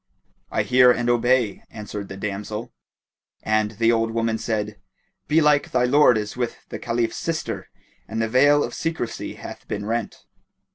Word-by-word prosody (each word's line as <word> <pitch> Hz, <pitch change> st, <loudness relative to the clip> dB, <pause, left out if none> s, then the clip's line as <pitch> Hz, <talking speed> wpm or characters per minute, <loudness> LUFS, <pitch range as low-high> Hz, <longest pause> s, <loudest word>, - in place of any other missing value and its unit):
"I -, -, 0 dB
hear 125 Hz, 0 st, +6 dB
and 120 Hz, 0 st, +2 dB
I -, -, +5 dB
obey," 120 Hz, -3 st, +1 dB
answered 105 Hz, -2 st, -7 dB
the 95 Hz, -, -8 dB
damsel 105 Hz, +2 st, -5 dB, 0.7 s
and 110 Hz, 0 st, +1 dB
the 115 Hz, +2 st, +3 dB
old 115 Hz, -1 st, +1 dB
woman 115 Hz, 0 st, -1 dB
said, 105 Hz, -2 st, -3 dB, 0.5 s
"Belike 150 Hz, -1 st, +3 dB
thy 125 Hz, -1 st, +1 dB
lord 125 Hz, -1 st, +5 dB
is 105 Hz, -1 st, -4 dB
with 120 Hz, -1 st, -2 dB
the -, -, -6 dB
Caliph's 115 Hz, -1 st, -1 dB
sister 165 Hz, -1 st, -3 dB, 0.4 s
and 110 Hz, +1 st, -4 dB
the 115 Hz, -, +1 dB
veil 145 Hz, +5 st, +4 dB
of -, -, -4 dB
secrecy 160 Hz, -8 st, -3 dB
hath -, -, -10 dB
been 100 Hz, -1 st, -4 dB
rent." 115 Hz, 0 st, -3 dB
115 Hz, 160 wpm, -23 LUFS, 105-125 Hz, 0.7 s, hear